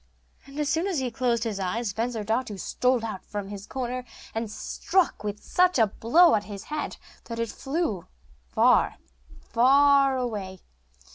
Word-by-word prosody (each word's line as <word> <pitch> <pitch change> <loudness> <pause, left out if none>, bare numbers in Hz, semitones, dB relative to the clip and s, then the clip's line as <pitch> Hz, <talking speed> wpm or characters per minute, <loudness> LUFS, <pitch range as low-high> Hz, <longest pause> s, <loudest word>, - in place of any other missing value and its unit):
And 275 +2 -8
as 300 - 0
soon 325 +6 +1
as 375 -5 -1
he 260 -2 -1
closed 235 -2 0
his 215 -4 -3
eyes, 200 +3 -2
Bensurdatu 225 0 -2
stole 250 +4 +1
out 215 -4 -5
from 205 -2 -6
his 205 0 -8
corner, 255 -1 -3 0.3
and 225 0 -3
struck 360 - 0 0.2
such 360 - +2
a 225 - +6
blow 240 - +4
at 205 - +1
his 200 -1 -8
head 300 0 -4 0.3
that 230 - -6
it 230 -1 -1
flew 270 - -2 0.4
far, - - +4 0.6
far 275 +2 +5
away. 205 -7 -4
235 Hz, 150 wpm, -26 LUFS, 210-275 Hz, 0.6 s, a